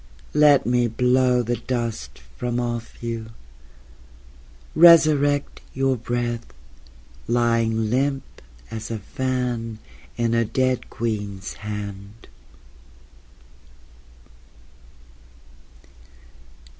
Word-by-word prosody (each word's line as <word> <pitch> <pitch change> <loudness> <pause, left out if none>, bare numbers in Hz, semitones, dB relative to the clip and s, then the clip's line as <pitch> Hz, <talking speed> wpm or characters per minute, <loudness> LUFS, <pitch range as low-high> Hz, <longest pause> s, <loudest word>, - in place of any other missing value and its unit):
Let 150 -2 +5
me 120 0 +2
blow 125 +1 +2
the 120 +1 -1
dust 115 - -4 0.2
from 120 0 -2
off 120 -1 -4
you... 115 -1 -5 1.4
Resurrect 155 -4 +5
your 135 0 +2
breath 120 0 -3 0.8
Lying 115 -2 +1
limp 135 +1 +1 0.5
as 110 -1 -6
a 115 - -3
fan 120 0 -3 0.4
In 115 -1 +1
a 115 0 +3
dead 130 +3 0
queen's 105 -4 -4
hand. 105 0 -7
120 Hz, 75 wpm, -23 LUFS, 115-130 Hz, 1.4 s, Let